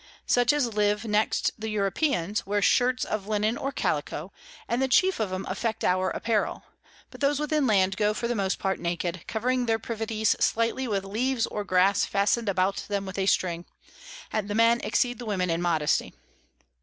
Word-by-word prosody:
Such 245 Hz, 0 st, +3 dB
as 270 Hz, -6 st, 0 dB
live 210 Hz, +1 st, +1 dB
next 215 Hz, 0 st, +1 dB
the 220 Hz, +1 st, -4 dB
Europeans, 210 Hz, -, 0 dB
wear 205 Hz, +1 st, 0 dB
Shirts 250 Hz, +5 st, +2 dB
of 210 Hz, -2 st, -4 dB
Linen 215 Hz, +1 st, 0 dB
or 275 Hz, -, -3 dB
Callico, 155 Hz, -, -2 dB, 0.4 s
and 235 Hz, +2 st, 0 dB
the 265 Hz, -, +2 dB
chief 370 Hz, +7 st, +3 dB
of 210 Hz, -4 st, -1 dB
'em 185 Hz, +1 st, -3 dB
affect 225 Hz, -2 st, -3 dB
our 185 Hz, +1 st, +2 dB
Apparel; 225 Hz, -3 st, -1 dB, 0.5 s
but -, -, -13 dB
those 285 Hz, 0 st, +2 dB
within 300 Hz, -2 st, +1 dB
Land 195 Hz, -3 st, +2 dB
go 210 Hz, 0 st, +1 dB
for 235 Hz, -, -2 dB
the 240 Hz, -, 0 dB
most 195 Hz, -3 st, -1 dB
part 190 Hz, 0 st, -1 dB
naked, 170 Hz, 0 st, -3 dB
covering 245 Hz, +2 st, 0 dB
their 225 Hz, -1 st, +2 dB
Privities 220 Hz, -1 st, -1 dB
slightly 230 Hz, +3 st, +1 dB
with 200 Hz, -3 st, -1 dB
Leaves 240 Hz, +4 st, 0 dB
or 210 Hz, -, -4 dB
Grass 190 Hz, +1 st, +3 dB
fasten'd 205 Hz, +3 st, +1 dB
about 190 Hz, +1 st, +1 dB
them 200 Hz, -1 st, -2 dB
with 190 Hz, 0 st, -6 dB
a 190 Hz, -, 0 dB
string, 175 Hz, -2 st, 0 dB, 0.7 s
and 215 Hz, -2 st, -1 dB
the 205 Hz, -, -3 dB
Men 230 Hz, +1 st, +4 dB
exceed 245 Hz, -2 st, 0 dB
the 245 Hz, -, -6 dB
Women 185 Hz, -4 st, 0 dB
in 165 Hz, +1 st, -1 dB
Modesty. 160 Hz, -4 st, 0 dB
210 Hz, 185 wpm, -26 LUFS, 195-235 Hz, 0.7 s, Men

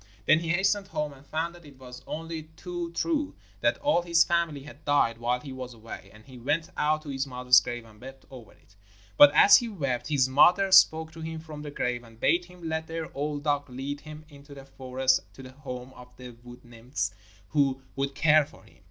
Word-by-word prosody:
Then 155 Hz, +6 st, +5 dB
he 165 Hz, -1 st, -5 dB
hastened 195 Hz, +3 st, +1 dB
home, 150 Hz, -6 st, -3 dB
and 135 Hz, 0 st, -17 dB
found 160 Hz, +3 st, -3 dB
that 175 Hz, 0 st, -15 dB
it 145 Hz, -3 st, -15 dB
was 125 Hz, -1 st, -11 dB
only 160 Hz, 0 st, -6 dB
too 175 Hz, -1 st, -5 dB
true 300 Hz, -, -1 dB, 0.2 s
that -, -, +1 dB
all 290 Hz, -11 st, +2 dB
his 170 Hz, -1 st, +4 dB
family 170 Hz, -5 st, -1 dB
had 145 Hz, 0 st, -13 dB
died 120 Hz, -6 st, +2 dB
while 120 Hz, +1 st, 0 dB
he 135 Hz, 0 st, -9 dB
was 130 Hz, -2 st, -8 dB
away; 110 Hz, -4 st, -10 dB
and 110 Hz, 0 st, -17 dB
he 130 Hz, -2 st, -13 dB
went 155 Hz, +7 st, -1 dB
out 155 Hz, +1 st, 0 dB
to 150 Hz, -, -9 dB
his 135 Hz, 0 st, -2 dB
mother's 125 Hz, 0 st, +5 dB
grave 120 Hz, -1 st, -6 dB
and 110 Hz, -1 st, -18 dB
wept 135 Hz, +1 st, -11 dB
over 125 Hz, -4 st, -12 dB
it. 100 Hz, -, -26 dB, 0.4 s
But 145 Hz, +6 st, +9 dB
as 200 Hz, -, +8 dB
he 235 Hz, -, -3 dB
wept, 140 Hz, -, -3 dB
his 140 Hz, -4 st, +2 dB
mother 175 Hz, +9 st, +4 dB
spoke 160 Hz, -4 st, +6 dB
to 165 Hz, -, -11 dB
him 160 Hz, 0 st, -5 dB
from 155 Hz, -2 st, -9 dB
the 150 Hz, -, -7 dB
grave 125 Hz, -4 st, -2 dB
and 115 Hz, -1 st, -17 dB
bade 170 Hz, +8 st, +2 dB
him 180 Hz, -1 st, -10 dB
let 160 Hz, 0 st, -3 dB
their 165 Hz, 0 st, -6 dB
old 145 Hz, 0 st, -3 dB
dog 145 Hz, -2 st, 0 dB
lead 135 Hz, +3 st, -5 dB
him 155 Hz, 0 st, -11 dB
into 145 Hz, -1 st, -14 dB
the 135 Hz, -1 st, -11 dB
forest 130 Hz, -1 st, 0 dB, 0.2 s
to 135 Hz, -, -11 dB
the 130 Hz, -, -11 dB
home 130 Hz, -2 st, -8 dB
of 125 Hz, -, -13 dB
the 125 Hz, -1 st, -10 dB
wood 120 Hz, +1 st, -15 dB
nymphs, 120 Hz, +3 st, -4 dB, 0.4 s
who 135 Hz, -3 st, +1 dB
would 140 Hz, 0 st, -2 dB
care 155 Hz, +1 st, +5 dB
for -, -, -18 dB
him. -, -, -22 dB
145 Hz, 220 wpm, -27 LUFS, 125-160 Hz, 0.4 s, But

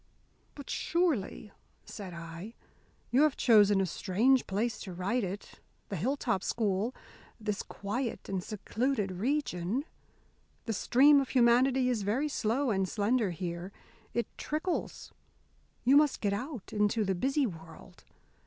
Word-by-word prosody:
'" -, -, -38 dB
"But 285 Hz, -, -9 dB
surely," 295 Hz, -, -1 dB, 0.3 s
said 195 Hz, -4 st, -8 dB
I, 170 Hz, +6 st, -8 dB, 0.6 s
"you 260 Hz, -, +4 dB
have 305 Hz, -3 st, +3 dB
chosen 210 Hz, -4 st, +5 dB
a 195 Hz, -, +2 dB
strange 220 Hz, +9 st, +2 dB
place 220 Hz, +4 st, -1 dB
to 190 Hz, -, -7 dB
write 200 Hz, +7 st, -1 dB
it 195 Hz, +2 st, -6 dB, 0.3 s
the 200 Hz, -, -3 dB
Hilltop 235 Hz, -, 0 dB
School 215 Hz, +2 st, 0 dB, 0.4 s
this 210 Hz, -2 st, -2 dB
quiet 230 Hz, +5 st, -4 dB
and 190 Hz, -2 st, -2 dB
secluded 220 Hz, +1 st, -2 dB
region! 220 Hz, -, -1 dB, 0.8 s
The 225 Hz, -, -1 dB
stream 280 Hz, +7 st, +5 dB
of 270 Hz, -, -4 dB
humanity 250 Hz, +1 st, +4 dB
is 245 Hz, -4 st, 0 dB
very 235 Hz, +10 st, 0 dB
slow 250 Hz, +1 st, 0 dB
and 190 Hz, -2 st, 0 dB
slender 220 Hz, 0 st, +1 dB
here 175 Hz, +2 st, -5 dB, 0.4 s
it 235 Hz, -, +1 dB
trickles. 315 Hz, +4 st, -3 dB, 0.7 s
You 265 Hz, +4 st, +6 dB
must 295 Hz, -2 st, +3 dB
get 200 Hz, -2 st, 0 dB
out 250 Hz, +1 st, -5 dB
into 210 Hz, +1 st, +1 dB
the 190 Hz, -, +1 dB
busy 270 Hz, +9 st, +1 dB
world. 165 Hz, -1 st, -10 dB
220 Hz, 135 wpm, -31 LUFS, 195-260 Hz, 0.8 s, You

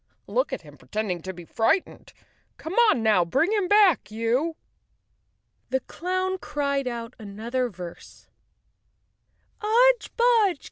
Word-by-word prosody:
"Look -, -, -1 dB
at -, -, -5 dB
him -, -, -15 dB
pretending 205 Hz, -5 st, -3 dB
to 190 Hz, -, -5 dB
be 175 Hz, -2 st, -11 dB
frightened. 225 Hz, -, -1 dB, 0.5 s
Come 320 Hz, -, -7 dB, 0.2 s
on 235 Hz, -, +2 dB
now, 210 Hz, -5 st, +4 dB
bring 270 Hz, -, +1 dB
him 410 Hz, -4 st, +1 dB
back, 405 Hz, -5 st, +4 dB
you!" 235 Hz, +9 st, 0 dB, 1.1 s
The 265 Hz, 0 st, 0 dB
clown 370 Hz, +5 st, -2 dB
cried 280 Hz, -4 st, -2 dB
out 235 Hz, -1 st, -5 dB
another 230 Hz, +5 st, -3 dB
verse: 175 Hz, -4 st, -11 dB, 0.7 s
" -, -, -42 dB
Udge! 480 Hz, +3 st, +3 dB
Budge! 455 Hz, -, +3 dB
265 Hz, 130 wpm, -25 LUFS, -, 1.1 s, now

